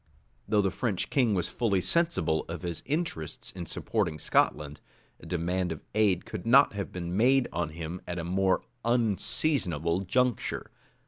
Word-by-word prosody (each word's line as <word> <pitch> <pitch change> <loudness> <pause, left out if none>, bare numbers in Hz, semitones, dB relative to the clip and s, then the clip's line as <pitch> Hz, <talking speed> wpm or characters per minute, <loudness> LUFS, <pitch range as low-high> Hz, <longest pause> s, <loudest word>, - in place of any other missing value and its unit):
Though 105 -2 +3
the 95 - +1
French 110 -7 -2
king 120 -7 +3
was 90 - 0
fully 105 -6 0
sensible 90 - +2
of 85 +2 -6
his 85 -2 -3
interest 145 - -3
in 85 -3 -6
supporting 90 -6 -1
Scotland, 75 -1 +1 0.4
a - - -12
demand 90 +1 -1
of 80 - -6
aid 100 -4 +2
could 105 -5 -6
not 130 +4 +6
have 100 -1 -4
been 90 -1 -4
made 130 +4 +4
on 85 -1 -1
him 85 +2 -6
at 90 - -4
a 85 - -3
more 95 +2 +1 0.2
unseasonable 110 - +1
juncture. 125 +5 0
95 Hz, 155 wpm, -29 LUFS, 85-115 Hz, 0.4 s, not